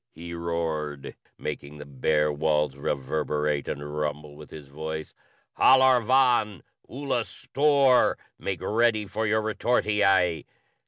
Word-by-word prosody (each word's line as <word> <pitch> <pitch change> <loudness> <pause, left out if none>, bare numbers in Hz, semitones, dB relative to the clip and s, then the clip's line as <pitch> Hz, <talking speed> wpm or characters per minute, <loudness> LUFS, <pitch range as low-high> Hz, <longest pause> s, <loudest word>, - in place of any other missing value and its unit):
he 85 +1 -9
roared, 80 -4 -4 0.2
making 70 +1 -6
the 75 - -9
bare 75 +2 0
walls 75 -1 0
reverberate 75 +1 -2
and 75 +1 -5
rumble 75 0 -4
with 75 0 -13
his 75 -3 -11
voice. 80 +2 -6 0.5
"Halor 130 -1 +6
vàn! 120 -5 +2 0.3
Ula 135 -2 -2
Storr!" 140 0 +2
[Footnote - - -28 0.2
1: - - -21
Make 95 -3 -3
ready 110 -1 +1
for 110 +2 -3
your 110 +1 +1
retortii. 105 -6 +1
85 Hz, 125 wpm, -26 LUFS, 75-110 Hz, 0.5 s, Halor